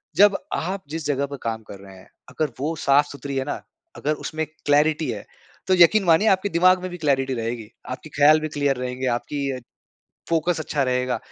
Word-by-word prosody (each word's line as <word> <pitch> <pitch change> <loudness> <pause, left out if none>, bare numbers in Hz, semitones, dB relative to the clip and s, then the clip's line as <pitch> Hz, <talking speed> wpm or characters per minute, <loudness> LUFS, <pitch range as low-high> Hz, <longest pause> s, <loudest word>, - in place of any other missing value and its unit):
जब 205 0 +6 0.2
आप 190 +3 -3
जिस 160 -1 -5
जगह 140 -1 0
पर 140 0 -7
काम 110 -1 -3
कर 100 - -10
रहे 95 -1 -13
हैं 95 - -16 0.2
अगर 155 -3 -2
वो 155 +4 -1
साफ़-सुथरी 140 0 +1
है 135 - 0
ना 145 - -4 0.4
अगर 150 - 0
उसमें 160 0 -2 0.2
क्लैरिटी 150 +2 +3
है। - - -7 0.4
तो 190 - +4
यकीन 185 +4 +6
मानिए 170 +6 +4
आपके 195 0 +3
दिमाग 185 +2 +4
में 185 - -4
भी 175 - -6
क्लैरिटी 135 -4 +1
रहेगी, 115 -2 -4 0.2
आपके 130 +4 -7
ख़याल 150 +1 +5
भी 155 - -3
क्लियर 145 -1 +2
रहेंगे, 125 +1 -3
आपकी 140 +3 -3
अ, 130 - -4 0.7
फोकस 170 +1 +1
अच्छा 150 -2 -1
रहेगा। 125 -1 0
145 Hz, 195 wpm, -23 LUFS, 130-165 Hz, 0.7 s, जब